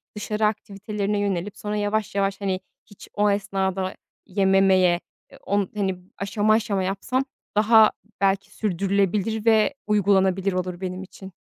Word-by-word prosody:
dışarı 210 +1 -1
aktivitelerine 210 -1 -2
yönelip, 200 -1 -2
sonra 210 0 -4
yavaş 210 0 -1
yavaş, 195 0 0
hani, 190 -2 -1 0.3
hiç 205 - -15
o 210 0 +2
esnada 190 -2 -1 0.3
yememeye, 190 -2 +3 0.5
o, 200 +1 +1 0.2
hani, 195 -3 -1 0.2
aşama 205 +2 +1
aşama 215 -3 +1
yapsam 200 +8 -1 0.3
daha 220 +1 +6 0.3
belki 195 0 +1
sürdürülebilir 200 +2 0
ve 220 +3 +4
uygulanabilir 195 -2 +2
olur 180 0 -3
benim 185 0 -4
için. 190 0 -12
200 Hz, 125 wpm, -24 LUFS, 190-210 Hz, 0.5 s, daha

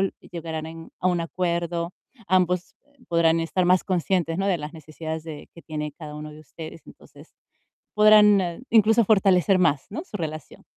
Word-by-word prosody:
l 195 - 0
llegarán 160 -2 -6
en 165 0 -10
a 185 - +2
un 175 -1 0
acuerdo, 170 0 -2 0.4
ambos, 180 -1 +1
eh, 285 -1 -32
podrán 165 -1 +3
estar 165 +3 0
más 185 0 +3
conscientes, 175 -2 0
¿no? 195 - 0
De 190 -3 +1
las 150 0 -7
necesidades 160 0 -7
de 155 -3 -9
que 170 - -13
tiene 150 -1 -5
cada 150 -3 -8
uno 150 0 -7
de 150 +1 -13
ustedes, 155 +2 -11
entonces - - -17 0.6
podrán, 210 -1 +6
ah, 175 -2 -3
incluso 225 +1 +5
fortalecer 195 -3 +3
más, 155 -6 +2
¿no?, 305 - -5
su 215 - -7
relación. 155 -5 -7
170 Hz, 180 wpm, -24 LUFS, 160-190 Hz, 0.6 s, podrán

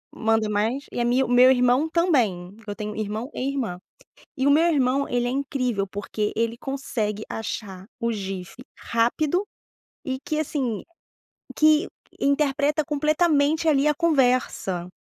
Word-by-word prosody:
manda 220 -1 +1
mais, 220 +7 -1
e - - -4
a 240 - +1
minha 250 +2 +3
o - - -7
meu 250 +1 +7
irmão 250 +4 +3
também, 240 - +1
porque 220 -2 -13
eu - - -5
tenho 210 -1 -5
irmão 215 +4 -4
e 260 - -3
irmã. 245 -10 -3 0.6
E 265 - 0
o - - +6
meu 320 +4 +5
irmão, 275 -4 +2
ele 245 0 0
é - - 0
incrível, 255 -6 -1
porque 205 +1 -3
ele 230 +1 -1
consegue 230 -6 -3
achar 195 -4 -5
o 235 -1 0
GIF 195 -4 -5 0.2
rápido 295 - 0 0.6
e 260 -1 -3
que, 310 -3 -2
assim, 270 -8 -2 0.7
que 310 +4 +4 0.3
interpreta 285 +1 +1
completamente 305 +1 +2
ali 290 -1 +3
a 300 - +2
conversa. 255 - +1
255 Hz, 150 wpm, -24 LUFS, 220-290 Hz, 0.7 s, meu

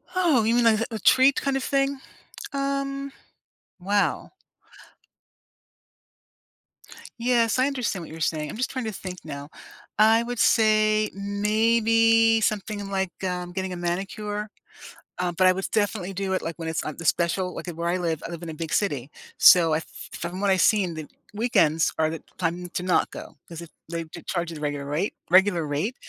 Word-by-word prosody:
Oh, 330 -10 +3
you 225 +2 +2
mean 240 -1 +3
like 220 -1 +4
a - - +1
a - - -4
treat 260 +7 +4
kind 275 -1 0
of 270 - -4
thing? 275 0 0 0.5
Um, 275 0 -2 0.7
wow. 195 -3 0 2.9
Yes, 235 -1 +2
I 255 - +3
understand 250 -10 -2
what 160 - -11
you're 160 - -9
saying, 155 -2 -1
I'm - - -7
just 255 - -1
trying 255 -3 -4
to 220 - -2
think 185 -2 -7
now. 145 -1 -7 0.5
I 220 +2 +5
would 240 0 -4
say, 215 -1 +3
mm, 200 0 -4
maybe 225 +1 +4
something 205 -1 -2
like, 190 -2 -1
um, 180 -1 -3
getting 190 0 -3
a - - -4
manicure, 205 +4 -3 0.7
um, 175 -1 -1
but 185 - +4
I 185 - +7
was 190 +1 -3
definitely 205 -3 -1
do 190 0 -2
it, 185 - 0
like, 165 0 -5
when 165 -1 -6
it's 160 -1 -2
on 155 - -5
the 170 - -8
special, 180 +3 +1
like, - - -7
at 175 - -5
where 170 +1 -3
I 180 - +1
live 165 -3 -2
I - - -6
live 170 -1 -7
in 170 - -7
a - - -5
big 160 0 -5
city. 145 -9 -1 0.3
So, 170 -6 +7
I - - +3
f 160 - -6 0.3
from 175 +3 -5
what 200 - +1
I 190 - +4
seen, 185 -4 +2
the 155 -2 -7 0.3
weekends 165 -9 +2
are 155 0 +3
the 165 -1 -7 0.2
time 175 0 -2
to 180 - -4
not 180 -1 +1
go, - - -10
'cause 170 0 -9
it 170 - -10 0.2
they 165 -1 -4
j 155 - -11
charge 175 -2 -2
you 165 - -7
the 150 - -9
regular 145 -1 -3
rate 160 +8 -1 0.2
regular 180 -3 +4
rate, 155 - -2
190 Hz, 195 wpm, -25 LUFS, 170-225 Hz, 2.9 s, I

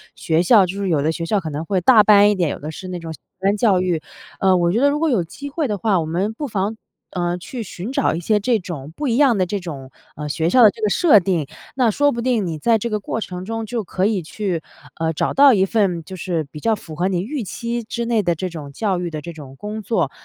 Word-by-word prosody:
学 160 +1 +1
校。 200 0 +6
就 190 +3 -5
是 200 -1 -2
有 155 -4 +2
的 155 +3 +1
学 165 +1 -4
校 205 +5 +1
可 165 - -5
能 150 +2 -4
会 190 0 0
大 215 +3 +6
班 205 0 +6
一 210 - +2
点， 175 -5 0
有 - - -6
的 150 - -6
是 185 +4 -8
那 180 -1 -5
种 165 -1 -7
小 - - -14 0.2
班 195 +2 +1
教 200 -4 +3
育。 175 -4 0 0.4
呃， 190 -1 +4
我 170 -1 +2
觉 220 - +1
得 285 - +5
如 295 - -1
果 325 0 +1
有 225 -10 +2
机 280 - -8
会 295 +1 -1
的 210 -3 -2
话， 200 -2 +2
我 160 - -2
们 180 +7 -1
不 290 +6 -5
妨， 210 -1 -2 0.4
呃， 175 -1 -1
去 230 +7 -6
寻 195 +3 -7
找 - - +1
一 - - -3
些 210 +5 +1
这 230 +2 +1
种 155 -6 -7
不 295 - -3
一 235 - +1
样 265 -6 +4
的 185 - +2
这 200 +3 -3
种， 145 -7 -8 0.3
呃， 150 0 -4
学 160 +3 0
校 250 - +5
的 215 - +9
这 225 - -14
个 215 - +2
设 290 - +5
定， 175 -5 -1 0.3
那 250 -3 +3
说 290 +5 +2
不 235 - -3
定 235 -4 +1
你 160 -2 -3
在 225 +9 +3
这 235 - -3
个 215 -1 -1
过 220 +2 -4
程 180 -2 -6
中 225 +1 -4
就 230 0 -3
可 185 +2 -1
以 210 -4 0
去， 180 0 -3 0.4
呃， 160 0 0
找 155 - -1
到 275 -1 +7
一 190 -3 +3
份 195 -5 0
就 185 - -9
是 170 -3 -2
比 150 - -8
较 225 +6 +1
符 165 -6 -11
合 175 +4 0
你 180 -2 0
预 250 +5 -4
期 235 +4 -4
之 235 +2 -4
内 230 -2 +2
的 175 -2 +2
这 185 +3 -4
种 155 -5 -8
教 190 +3 -1
育 175 -1 -3
的 155 -1 -5
这 170 - -7
种 140 -4 -11
工 210 +6 -6
作。 225 +3 0
195 Hz, 300 characters per minute, -20 LUFS, 170-225 Hz, 0.4 s, 的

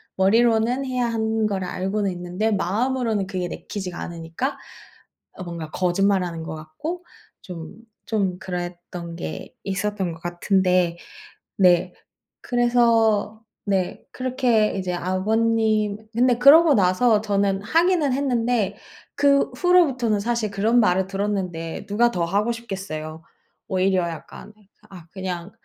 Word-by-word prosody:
머리로는 230 +6 +3
해야 250 -2 -1
하는 220 -1 0
거를 190 -3 -2
알고는 195 +3 -1
있는데 180 +5 -2
마음으로는 220 +1 0
그게 185 -2 -3
내키지가 180 0 -6
않으니까 170 - -4 0.8
어 185 - -8
뭔가 170 -3 -6
거짓말하는 180 -1 0
것 160 0 -6
같고 300 - -6 0.4
좀, 170 -1 -8 0.3
좀 195 -5 -1
그랬던 175 -2 -6
게 80 0 -7
있었던 195 -2 -2
것 165 - -12
같은데 180 0 +1 0.6
네. 180 -1 +4 0.5
그래서 230 -3 +2 0.2
네 190 -3 -1
그렇게 250 -4 +1
이제 185 -2 -2
아버님 215 +3 +1 0.2
근데 245 +1 +3
그러고 295 +4 +7
나서 210 +3 +3
저는 200 -2 0
하기는 330 - +2
했는데 240 -6 0 0.4
그 280 -1 +3
후로부터는 265 - +3
사실 230 -1 -1
그런 220 +5 +2
말을 190 -3 +2
들었는데 190 -5 -3
누가 235 +4 +2
더 175 -5 -1
하고 205 +7 0
싶겠어요. 165 -8 -6 0.5
오히려 185 -1 +2
약간 160 +6 -10 0.4
아 175 -4 -12
그냥 185 -1 -5
200 Hz, 270 characters per minute, -23 LUFS, 180-235 Hz, 0.8 s, 그러고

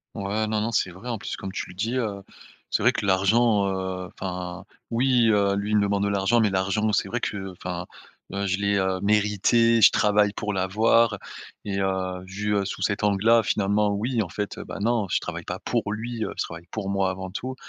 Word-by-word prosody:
Ouais, 100 +2 -1
non, 110 0 0
non, 110 +2 -1
c'est 95 -3 +1
vrai 95 +8 -9
en 115 - -2
plus 105 - -5
comme 95 -1 -6
tu - - -4
le - - -10
dis, 110 +7 -2
heu, 105 -5 -2 0.5
c'est - - 0
vrai - - +6
que - - -3
l'argent, 100 +2 +3
heu, 95 -1 -3
enfin, 90 0 -5 0.2
oui, 120 -1 +3
heu, 100 -1 +2
lui, 100 +1 -2
il 105 - +4
me 105 - +3
demande 100 0 0
de 100 - +1
l'argent 100 +4 +2
mais 110 - +3
l'argent 100 +3 0
c'est 100 - +1
vrai 120 - -3
que 95 -2 -3
enfin, 90 -1 -5 0.5
heu, 100 0 -1
je 95 -1 0
l'ai, 100 0 +1
heu, 95 -1 0
mérité, 105 +3 +3
je - - +9
travaille 105 -1 +2
pour 105 0 -3
l'avoir 105 +3 +3 0.5
et 100 -1 -2
heu, 95 -1 -1
vu, 105 +2 -2
heu, 100 -1 +1
sous 100 - -5
cet 100 0 0
angle-là, 105 +3 +4
finalement, 105 0 +1
oui, 115 +3 0
en 100 - -2
fait, 100 +4 -4
heu, - - -7
bah, - - -7
non, 115 -1 +1
je - - +2
travaille - - -6
pas - - -4
pour 105 - -1
lui, 115 +1 -4
heu, - - -5
je - - 0
travaille 85 +1 -9
pour 100 -3 -4
moi 95 -1 +1
avant 95 0 -5
tout, 130 +6 -5
100 Hz, 225 wpm, -25 LUFS, 95-110 Hz, 0.5 s, je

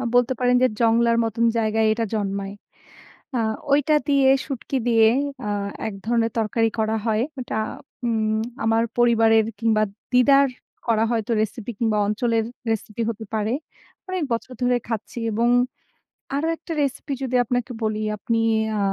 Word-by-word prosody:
বলতে 245 +1 +4
পারেন 250 0 +3
যে, - - +6
জংলার 230 0 +3
মতন 225 +1 0
জায়গায় 220 0 +2
এটা 225 +1 -1
জন্মায়। 200 -2 -2 0.8
আ - - +2 0.3
ঐটা 295 +2 +4
দিয়ে, 275 -2 +4 0.2
শুটকি 270 -1 -4
দিয়ে 225 -2 +5 0.4
আ - - -2 0.4
এক 215 - -6
ধরনের 230 -1 +2
তরকারি 225 +1 +1
করা 220 0 +1
হয়। 220 0 +2 0.2
ওটা 245 - -4 0.5
উম 220 -1 +1 0.2
আমার 225 0 +3 0.2
পরিবারের 225 -2 +5 0.2
কিংবা 220 -2 +2 0.3
দিদার 275 +2 +5 0.4
করা 225 -2 +2
হয়তো 230 -2 -1
রেসিপি 220 +1 -4
কিংবা 220 -2 +1
অঞ্চলের 225 +1 +1 0.3
রেসিপি 220 +1 -2
হতে 220 0 -6
পারে। 215 +1 0 0.6
অনেক 370 -4 -1
বছর 230 +2 -3
ধরে 245 0 +3
খাচ্ছি 225 +1 -4
এবং 230 +3 +2 0.9
আরো 295 +3 0
একটা 335 - -10
রেসিপি 280 +1 -3
যদি 255 -1 -2
আপনাকে 245 +2 -1
বলি, 215 -1 0 0.2
আপনি 230 +3 -1 0.4
আ - - 0
230 Hz, 145 wpm, -23 LUFS, 220-245 Hz, 0.9 s, যে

